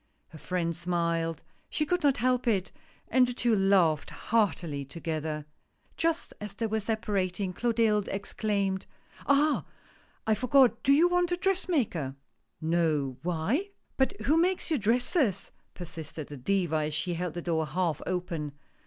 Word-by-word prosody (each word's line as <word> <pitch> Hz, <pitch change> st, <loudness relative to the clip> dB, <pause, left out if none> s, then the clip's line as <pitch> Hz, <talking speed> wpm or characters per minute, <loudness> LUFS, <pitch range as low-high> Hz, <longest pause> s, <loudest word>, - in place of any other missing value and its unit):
Her 160 Hz, -, -12 dB
friend 170 Hz, -1 st, -1 dB
smiled, 170 Hz, -1 st, -1 dB, 0.3 s
she 305 Hz, -, 0 dB
could 355 Hz, +3 st, 0 dB
not 280 Hz, -3 st, +3 dB
help 250 Hz, +1 st, +1 dB
it, 200 Hz, -4 st, +1 dB, 0.4 s
and 255 Hz, -1 st, +4 dB
the 245 Hz, -, -4 dB
two 235 Hz, -2 st, +2 dB
laughed 190 Hz, -6 st, +3 dB
heartily 180 Hz, -10 st, 0 dB
together. 155 Hz, +1 st, -4 dB, 0.5 s
Just 330 Hz, 0 st, -1 dB
as 210 Hz, -1 st, -6 dB
they 225 Hz, -, -2 dB
were 220 Hz, 0 st, 0 dB
separa 210 Hz, -3 st, -1 dB
ting 185 Hz, 0 st, -3 dB
Clotilde 225 Hz, -1 st, +2 dB
exclaimed: 200 Hz, -1 st, -1 dB, 0.2 s
" -, -, -20 dB
Ah! 290 Hz, +2 st, +3 dB, 0.6 s
I 220 Hz, -, +3 dB
forgot, 250 Hz, 0 st, +4 dB
do 275 Hz, -, +3 dB
you 310 Hz, +5 st, +6 dB
want 355 Hz, 0 st, +1 dB
a 355 Hz, -, +1 dB
dress 375 Hz, 0 st, 0 dB
maker? 175 Hz, -, 0 dB
" -, -, -48 dB
" -, -, -42 dB, 0.2 s
No 145 Hz, -6 st, +1 dB
— -, -, -40 dB
why?" 180 Hz, -, 0 dB, 0.3 s
"But 275 Hz, +10 st, +1 dB
who 305 Hz, +3 st, +3 dB
makes 360 Hz, +1 st, +1 dB
your 305 Hz, -, +2 dB
dresses?" 235 Hz, -, +1 dB, 0.2 s
persisted 160 Hz, -3 st, -7 dB
the 145 Hz, -, -7 dB
Diva 175 Hz, +3 st, +1 dB
as 150 Hz, 0 st, -1 dB
she 175 Hz, +3 st, -1 dB
held 175 Hz, -1 st, -3 dB
the 175 Hz, -, -3 dB
door 160 Hz, -2 st, 0 dB
half 165 Hz, 0 st, -1 dB
open. 175 Hz, -5 st, -3 dB
195 Hz, 165 wpm, -29 LUFS, 165-250 Hz, 0.6 s, you